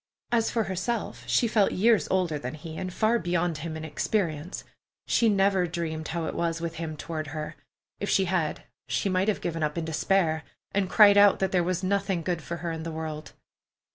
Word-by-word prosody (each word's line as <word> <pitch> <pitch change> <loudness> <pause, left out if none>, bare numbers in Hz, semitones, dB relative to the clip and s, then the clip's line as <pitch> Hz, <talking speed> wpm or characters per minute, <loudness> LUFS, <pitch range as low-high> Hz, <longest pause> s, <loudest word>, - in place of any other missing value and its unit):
As 230 -2 +2
for 230 - 0
herself, 200 +4 -3
she 235 - +3
felt 215 -3 +2
years 220 +3 +3
older 175 -5 +1
than 130 +2 -5
he, 160 +1 -8
and 185 +2 -4
far 220 +5 +2
beyond 175 -3 0
him 160 -1 -5
in 160 - -6
experience. 160 0 -2 0.4
She 230 - +3
never 195 -2 +3
dreamed 160 -2 -3
how 170 0 -2
it - - -3
was 165 -1 -1
with 165 -1 -4
him 160 -2 -4
toward 155 -1 -4
her. 155 +1 -5 0.4
If 200 - -3
she 190 - +3
had, 175 -4 -1 0.2
she 200 - 0
might 185 +1 +1
have 215 - 0
given 165 -1 -3
up 150 +1 -1
in 165 - -1
despair, 160 0 +1 0.3
and 195 -2 0
cried 205 -1 +7
out 205 -1 +7
that 190 -1 0
there 180 -2 +2
was 185 +1 -1
nothing 195 -2 0
good 175 -1 -1
for 170 +2 -5
her 170 - -1
in 160 -1 -4
the 165 - -4
world. 155 -1 -6
175 Hz, 205 wpm, -27 LUFS, 160-195 Hz, 0.4 s, cried